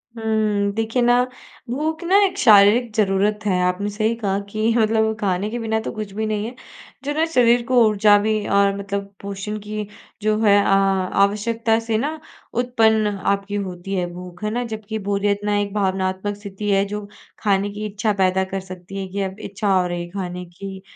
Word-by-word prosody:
हुँ, 215 -2 0
देखिए 225 +3 0
ना, 245 +1 +4 0.5
भूख 310 +7 -2
ना 370 +3 +4
एक 380 0 -2
शारीरिक 220 - +6
ज़रूरत 205 0 +2
है। 185 -3 +2
आपने 180 +3 0
सही 215 +2 0
कहा 200 -4 -1
कि 215 +2 0
मतलब 220 0 +2
खाने 195 +1 0
के 240 +2 -4
बिना 220 -1 -1
तो - - -2
कुछ 215 -2 -6
भी 220 +1 -2
नहीं 215 -1 -1
है, 240 +3 -7 0.5
जो 290 - -1
ना 315 +2 +2
शरीर 240 -1 +4
को 250 -2 +4
ऊर्जा 210 -1 +5
भी 215 0 0
और 200 0 +3
मतलब 200 0 -4
पोषण 200 +1 -5
की 210 0 -5 0.3
जो 215 0 +1
है 205 -2 +6
अ, - - -1
आवश्यकता 200 +4 +2
से 225 -1 -1
ना 300 +7 -2 0.3
उत्पन्न 225 -3 +2
आपकी 200 0 -2
होती 190 -1 -4
है 180 -2 0
भूख, 180 +1 -10
है 210 - 0
ना। 245 +2 -1
जबकि 220 -1 -5
बोरियत 200 0 +1
ना 205 0 +1
एक 200 -1 -2
भावनात्मक 190 0 -1
स्थिति 205 0 -6
है, 195 0 +3
जो 205 0 -5 0.3
खाने 200 -1 +1
की 210 +1 -5
इच्छा 210 +1 -1
पैदा 185 0 +2
कर 195 - 0
सकती 185 0 -9
है, 190 - -5
कि 200 +2 -4
अब 190 +1 -4
इच्छा 200 0 -1
हो 180 - +1
रही 175 0 -4
खाने 180 -1 -5
की। 190 +2 -9
205 Hz, 190 wpm, -21 LUFS, 195-220 Hz, 0.5 s, शारीरिक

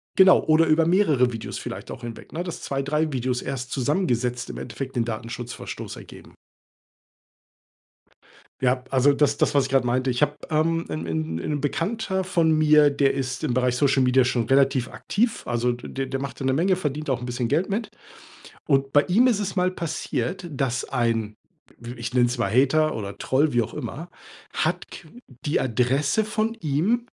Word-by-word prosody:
Genau 190 -1 +6
oder 160 +1 +4
über 160 +1 +4
mehrere 155 - +3
Videos 115 - -5
vielleicht - - -7
auch - - -7
hinweg, 120 -1 -9
ne, 175 +3 -3
dass 175 - -6
2, 135 0 -2
3 150 +2 0
Videos 125 -1 -1
erst 130 -2 -5
zusammengesetzt 125 -4 -1
im - - -7
Endeffekt 130 +3 -6
den 115 -2 +1
Datenschutzverstoß 115 +1 -6
ergeben. - - -13 2.3
Ja, 125 0 +1
also 135 +2 +4
das 145 0 +2
das, - - +1
was 140 -2 +4
ich - - -5
gerade 135 -2 +3
meinte, 130 +2 +1
ich 125 +3 -1
habe, 150 0 +2
ähm 165 +2 +1
'n 80 +1 -4
'n 80 0 -2
'n 145 - -2
Bekannter 190 +5 -1
von 170 -3 +2
mir, 150 -1 +5
der 140 -1 +2
ist 135 +2 -3
im 130 -6 0
Bereich 125 0 +1
Social-Media 130 -1 +3
schon 120 -2 0
relativ 135 -1 +3
aktiv. 230 +2 -1
Also, 120 0 +1
d 135 +2 -5
der 135 0 -4
macht 140 0 -6
da 135 - -3
'ne 130 - +2
Menge, 180 +6 +2
verdient 150 -3 -3
auch 130 -2 0
'n - - -5
bisschen 120 -1 -2
Geld 165 +8 +1
mit. 220 +3 -2 0.8
Und 135 -1 +1
bei 145 - +6
ihm 225 +8 +3
ist 230 -5 +3
es 195 -2 -3
mal 185 -1 +2
passiert, 170 0 -3
dass 130 -3 -1
ein 115 -4 -1 0.4
w 120 +1 -8
ich 120 +1 -5
nenn's 120 0 +3
mal 100 -5 0
Hater 145 +6 +3
oder 100 -2 -6
Troll, 145 +2 +1
wie 120 -1 +3
auch 115 - -6
immer, 170 +4 -6 0.4
hat - - -1
qu - - -11 0.4
die 145 - +1
Adresse 135 - +1
von 220 +1 -1
ihm, 195 +7 0
135 Hz, 185 wpm, -24 LUFS, 125-160 Hz, 2.3 s, Genau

